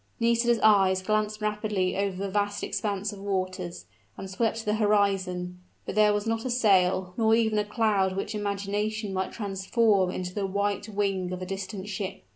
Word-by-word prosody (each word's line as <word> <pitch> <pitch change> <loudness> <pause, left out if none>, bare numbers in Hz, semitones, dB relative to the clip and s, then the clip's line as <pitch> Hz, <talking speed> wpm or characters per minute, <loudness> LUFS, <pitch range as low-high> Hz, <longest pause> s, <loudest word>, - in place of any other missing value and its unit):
Nisida's 235 0 +3
eyes 190 -3 +5
glanced 215 +1 0
rapidly 210 -3 -1
over 195 -1 -1
the 200 +1 -2
vast 205 0 -1
expanse 205 -1 -2
of 200 - -10
waters, 185 -3 -3 0.3
and 195 - -6
swept 225 +3 -1
the 210 - +1
horizon: 195 -4 +1 0.3
but - - -4
there 210 0 +5
was 205 +1 -1
not 225 0 -1
a 260 - -3
sail, 190 -6 +2
nor 220 -1 +4
even 220 -2 +2
a - - +1
cloud 205 -3 +1
which 195 +3 -3
imagination 205 +1 -2
might 190 0 -2
transform 200 -1 +1
into 180 0 -4
the 200 -1 -2
white 200 +1 -1
wing 195 -3 -1
of 185 0 -4
a - - -4
distant 195 +1 -5
ship. 195 -1 -5
205 Hz, 175 wpm, -27 LUFS, 190-215 Hz, 0.3 s, eyes